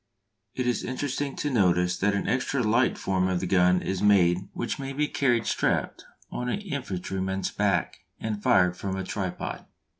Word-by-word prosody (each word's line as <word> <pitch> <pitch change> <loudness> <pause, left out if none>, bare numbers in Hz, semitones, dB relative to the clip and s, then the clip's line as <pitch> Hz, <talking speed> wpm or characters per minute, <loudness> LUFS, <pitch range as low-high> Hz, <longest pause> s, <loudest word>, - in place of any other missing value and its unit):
It 125 - -1
is 125 -1 0
interesting 140 +1 -3
to 145 - -2
notice 90 -5 +3
that 100 +1 +2
an 100 - -2
extra 130 +2 0
light 115 +4 +2
form 95 -1 0
of 90 -1 0
the 95 - -3
gun 90 0 +3
is 95 -1 -2
made 95 -2 +3
which 120 - -3
may 135 0 -4
be 150 +2 0
carried 120 -6 +1
strapped - - -1 0.3
on 125 0 -3
an 200 - -2
infantryman's 95 - -3
back 100 -4 0 0.2
and 105 -2 -3
fired 90 -8 +4
from 95 +1 -4
a 95 - -3
tripod. 95 -1 -4
100 Hz, 175 wpm, -27 LUFS, 95-125 Hz, 0.3 s, fired